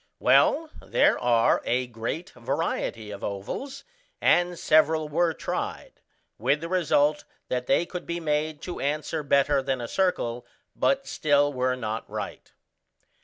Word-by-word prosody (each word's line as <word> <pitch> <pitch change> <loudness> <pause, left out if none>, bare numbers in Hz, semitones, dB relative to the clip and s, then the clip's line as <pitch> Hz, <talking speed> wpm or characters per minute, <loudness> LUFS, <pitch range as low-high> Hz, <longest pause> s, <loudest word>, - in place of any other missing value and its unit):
Well, 320 -1 +3
there - - +2
are 120 -2 +3
a 125 +1 0
great 120 +9 -5
variety 120 -4 -3
of 100 - -8
ovals, 100 - -5 0.4
and 175 0 +3
several 155 0 +3
were 165 +3 +1
tried: - - -5 0.4
with 135 +7 +2
the 165 - -4
result 155 -4 +2 0.3
that 125 0 -2
they 175 - +3
could 180 0 -7
be 170 0 -2
made 150 -1 -1
to 180 - -5
answer 150 +2 -2
better 140 0 +3
than 135 -1 -2
a 120 - -4
circle, 125 -9 0 0.3
but 275 0 +1
still 145 -1 +2
were 130 0 0
not 110 -2 -4
right. - - -6
145 Hz, 140 wpm, -26 LUFS, 125-165 Hz, 0.4 s, Well